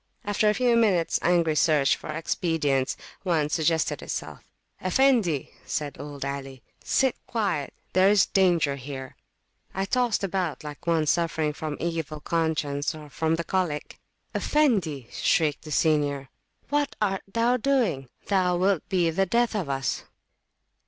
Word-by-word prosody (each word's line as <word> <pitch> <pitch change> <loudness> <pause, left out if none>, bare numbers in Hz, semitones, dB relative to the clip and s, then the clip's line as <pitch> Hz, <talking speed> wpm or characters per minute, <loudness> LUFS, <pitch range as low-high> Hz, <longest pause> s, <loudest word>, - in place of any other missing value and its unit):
After 205 +1 +2
a 210 - +2
few 245 -2 +3
minutes 200 -8 +3
angry 170 -2 +3
search 150 -3 +3
for - - -10
expedients, 155 -4 0 0.2
one 160 -6 +1
suggested 160 +1 +1
itself. - - -5 0.4
Effendi! 190 - +2
said 145 -2 -3
old 145 -1 -6
Ali, 135 -2 -6 0.2
sit 265 -2 +2
quiet; 195 -11 -1 0.2
there 185 +2 +5
is 205 -2 +5
danger 170 -7 +2
here. 130 -1 -7 0.6
I 195 +1 0
tossed 240 0 +1
about 185 -6 -2
like 150 +2 -9
one 165 -2 +2
suffering 160 -1 +1
from 155 -1 -5
evil 160 -3 -3
conscience 155 -3 -1
or 150 -2 -11
from 160 +3 0
the 170 - -3
[p.200] - - -31
colic. 175 -6 -2 0.3
Effendi! 190 - +1
shrieked 155 -2 +1
the 155 - -8
senior, 145 -3 +1 0.4
what 290 0 0
art 195 -2 0
thou 235 +3 +2
doing? 220 - 0 0.2
Thou 185 -3 +2
wilt 185 -2 +1
be 175 -3 +2
the 195 +4 +1
death 235 +4 +2
of 185 -9 -2
us. 135 -1 -2
165 Hz, 145 wpm, -26 LUFS, 150-195 Hz, 0.6 s, there